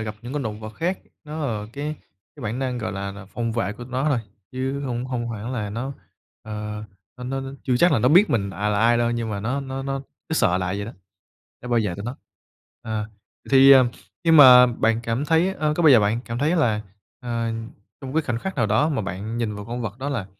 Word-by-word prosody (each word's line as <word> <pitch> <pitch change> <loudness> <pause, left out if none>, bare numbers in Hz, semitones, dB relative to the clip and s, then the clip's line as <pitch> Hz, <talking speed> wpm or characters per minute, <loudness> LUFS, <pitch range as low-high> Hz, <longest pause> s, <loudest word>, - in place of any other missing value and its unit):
gặp 110 -1 -4
những 120 +2 -7
con 145 -1 -2
động 110 -2 -5
vật 110 0 -8
khác, 180 - -1 0.3
nó 150 0 -4
là 105 -4 -3
cái 150 +3 -4 0.4
cái 140 - -10
bản 110 +3 -3
năng, 130 -2 -2
gọi 110 -4 -3
là 100 0 -4
là, 100 0 -10
phòng 115 +3 -3
vệ 110 -4 -1
của 120 +3 -9
tụi 125 - -14
nó 130 +4 0
rồi, 140 -5 +2 0.3
chứ 130 +2 -2
hông 125 -3 -3
hông 120 -2 -3
hẳn 115 +2 -5
là 105 -5 -3
nó, 125 +6 -4 0.5
ờ, 105 0 -6 0.3
nó 125 - -8
nó 135 +2 -2
nó 135 0 -6
chưa 125 -2 +1
chắc 170 +5 +4
là - - +3
nó 125 - +3
biết 185 +8 +6
mình, 100 -4 0
à, 100 +3 -2
là 105 -1 +1
ai 120 +1 +4
đâu 120 0 +2
nhưng 120 -2 -2
mà 100 -1 -3
nó 125 +7 -1
nó 135 0 -5
nó 135 0 -2 0.3
nó 160 - -1
sợ 90 - +3
lạ 90 - -2
vậy 100 - -3
đó, 115 - -7 0.7
nó 125 - -7
bảo 120 -1 +3
vệ 90 - -2
tụi 100 - -7
nó. 120 +3 -5 0.7
À, 110 -1 -3 0.4
thì, 135 0 +8
ừm, 130 -2 +7 0.4
nhưng 165 -1 +6
mà 125 -3 +10
bạn 115 -1 +1
cảm 115 +4 -1
thấy, 165 +4 +2
a, 155 -1 +2
có 175 - +1
bao 155 - +7
giờ 125 -5 +8
bạn 105 +3 +1
cảm 115 0 -4
thấy 155 +6 +2
là, 115 -10 +2 0.4
ờ, 115 -1 -2 0.5
trong 130 -1 -7
cái 160 - +2
khoảnh 120 -5 -2
khắc 190 +9 -4
nào 115 -4 +2
đó 110 +9 +2
mà 140 -7 -1
bạn 100 +4 -5
nhìn 115 -3 -1
vào 105 - -7
con 120 +3 -5
vật 110 0 -5
đó 135 +2 -3
là 120 -9 -3
120 Hz, 255 wpm, -23 LUFS, 110-135 Hz, 0.7 s, mà